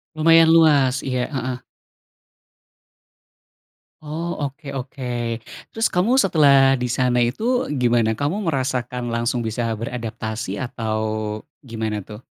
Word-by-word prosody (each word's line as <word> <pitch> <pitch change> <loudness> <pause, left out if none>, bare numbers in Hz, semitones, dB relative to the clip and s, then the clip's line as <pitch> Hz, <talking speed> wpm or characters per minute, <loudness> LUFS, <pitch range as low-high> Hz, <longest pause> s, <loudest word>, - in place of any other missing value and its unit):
Lumayan 165 +1 +6
luas, 140 -5 +4
iya, 125 -2 -1
heeh. 130 -1 -3 2.4
Oh, 165 +3 -4
oke 140 +2 -5
oke, 120 -3 -4 0.3
terus 225 +1 0
kamu 220 +9 +2
setelah 140 - +5
di 125 -1 -2
sana 125 0 +1
itu 240 - 0
gimana? 120 -3 +2
Kamu 165 +9 -1
merasakan 125 -3 -2
langsung 120 +1 0
bisa 115 +1 -2
beradaptasi 115 -1 -5
atau, 115 -4 -3 0.6
gimana 110 -4 -4
tuh? 105 +5 -12
125 Hz, 105 wpm, -21 LUFS, 120-150 Hz, 2.4 s, Lumayan